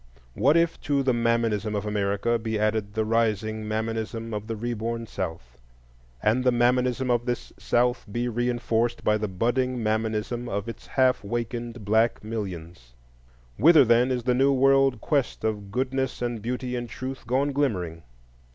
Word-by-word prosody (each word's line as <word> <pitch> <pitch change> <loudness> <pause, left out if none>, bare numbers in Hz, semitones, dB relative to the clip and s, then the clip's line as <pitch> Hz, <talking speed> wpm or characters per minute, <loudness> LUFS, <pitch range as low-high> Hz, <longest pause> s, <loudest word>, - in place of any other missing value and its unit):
What 140 - +3
if 170 0 +1
to 140 -1 +1
the 130 -1 +2
Mammonism 115 -3 0
of 105 +1 -2
America 105 +2 0
be 110 0 -2
added 105 -1 -1
the 110 0 +1
rising 110 -1 0
Mammonism 115 +1 -3
of 105 0 -4
the 115 - -3
re 120 +3 -3
born 115 +1 -3
South, 80 - -6 0.6
and 115 +4 +2
the 125 - +4
Mammonism 125 +1 +2
of 120 +1 0
this 120 0 -3
South 120 0 +1
be 120 +3 -1
reinforced 120 -1 0
by 105 0 +2
the 105 - -1
budding 120 +5 0
Mammonism 110 +2 -1
of 100 +2 -3
its 115 - -8
half 130 -3 +2
wakened 120 +1 -4
black 110 +3 +2
millions? 90 - -6 0.6
Whither, 155 +2 +7
then, 120 +2 +4
is 125 -2 -1
the 125 +1 +2
new 135 +3 +3
world 135 -2 +3
quest 140 -4 -1
of 105 -2 -2
Goodness 130 +3 -1
and 120 -2 -3
Beauty 125 +2 -3
and 120 -1 -4
Truth 130 -2 -6
gone 135 +4 +1
glimmering? 95 - -1
115 Hz, 160 wpm, -26 LUFS, 110-125 Hz, 0.6 s, Whither